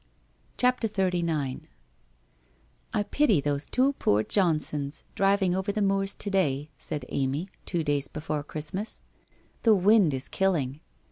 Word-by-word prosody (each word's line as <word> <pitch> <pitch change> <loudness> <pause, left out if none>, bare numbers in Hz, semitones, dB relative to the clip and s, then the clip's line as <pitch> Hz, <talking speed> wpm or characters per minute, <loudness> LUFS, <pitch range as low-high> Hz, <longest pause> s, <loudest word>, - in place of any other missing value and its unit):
' - - -37
CHAPTEE 250 -2 +2
XXXIX 170 -9 -1 0.6
' - - -36
I - - +2
pity 225 - +2
those 145 0 -1
two 265 +2 +2
poor 105 +1 +2
Johnsons, 150 - 0
driving 195 -2 +2
over 190 +2 -1
the 215 - -3
moors 195 0 +1
to 205 - -5
day/ 150 -6 0
said 150 -2 -4
Amy, 140 +7 -1 0.2
two 170 -3 0
days 145 -2 0
before 150 -1 -4
Christmas. 155 +8 -5 0.3
' - - -35
The 225 -2 +5
wind 195 -5 +4
is 130 - -3
killing. 155 -8 0
165 Hz, 145 wpm, -27 LUFS, 140-195 Hz, 0.6 s, The